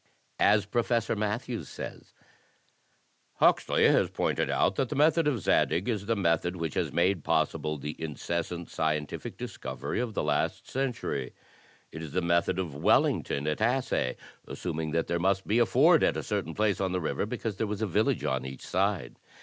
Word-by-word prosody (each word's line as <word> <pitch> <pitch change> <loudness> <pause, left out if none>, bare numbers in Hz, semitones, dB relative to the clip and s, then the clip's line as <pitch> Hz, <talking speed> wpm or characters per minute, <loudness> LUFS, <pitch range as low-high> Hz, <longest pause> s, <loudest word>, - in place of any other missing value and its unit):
As 105 0 +4
Professor 115 +1 0
Matthews 110 +3 -3
says: - - -8 1.2
"Huxley - - +3
has - - +3
pointed - - -1
out - - +2
that 130 - 0
the - - -3
method 160 +2 +4
of 130 -8 0
Zadig 90 +3 +2
is 105 -4 -2
the 115 - +2
method 90 -2 +1
which 80 -4 -3
has - - -1
made 90 -1 +1
possible 75 -1 0
the 75 +2 -5
incessant 85 +3 -4
scientific 75 -2 -2
discovery 70 +3 -5
of 120 -3 -3
the - - 0
last 75 -1 -1
century. 125 - -3 0.6
It 80 - -7
is 80 -3 -7
the 90 - +1
method 85 +1 +2
of 90 -6 -3
Wellington 70 0 +2
at 75 +6 -1
Assaye, 120 - +1 0.3
assuming 80 -3 -4
that 80 +1 0
there 85 - -1
must 95 +2 +1
be 110 +4 +2
a 120 - +4
ford 155 +7 +5
at - - +2
a - - -3
certain 95 -6 -3
place 105 -2 +1
on 95 -1 0
the 90 - 0
river 85 +4 -2
because 115 -3 -4
there 110 - -1
was 105 +1 -3
a - - +3
village 105 +3 +1
on 65 -1 -1
each 65 0 -8
side. 95 -9 -1
95 Hz, 180 wpm, -29 LUFS, 80-110 Hz, 1.2 s, ford